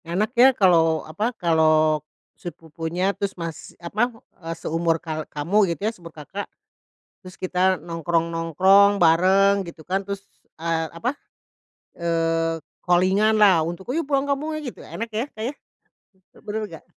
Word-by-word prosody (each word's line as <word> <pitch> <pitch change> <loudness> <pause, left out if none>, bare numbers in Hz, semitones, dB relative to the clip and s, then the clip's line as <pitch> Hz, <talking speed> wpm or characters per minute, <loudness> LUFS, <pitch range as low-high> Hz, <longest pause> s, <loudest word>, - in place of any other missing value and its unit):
Enak 200 +8 -1
ya, 255 +1 +7
kalau 165 -5 +3
apa, 185 +9 -2
kalau 155 -2 +3 0.3
sepupunya 170 +3 -4
terus 200 -1 -4
mas 165 -2 -7
apa, 210 +8 -1 0.3
eee, 165 0 -5
seumur 165 0 0
kal 155 -2 -6
kamu 180 +7 +1
gitu 170 - -4
ya, 220 - +1
seumur 170 -5 -12
Kakak. 165 +6 -8 0.7
Terus 185 -1 -12
kita 185 0 +1
nongkrong-nongkrong 170 +4 +2
bareng, 190 +4 +4
gitu 170 -3 -11
kan. 190 +2 -1
Terus, 200 0 -6 0.3
eee, 165 0 -1
apa, 235 +11 -3 0.8
eee, 165 -1 0 0.2
calling-an 190 +5 +3
lah 185 -6 +5
untuk, 175 +5 -6
"Ayo, 320 +5 -1
pulang 280 0 0
kampung 295 +3 -1
ayo!" 305 -4 -4
gitu, - - -15
enak 230 +1 -6
ya, 220 +3 -2
Kak, 215 - -7
ya. - - -6 0.9
Betul 215 0 -4
nggak? 160 - -12
175 Hz, 145 wpm, -23 LUFS, 165-200 Hz, 0.9 s, ya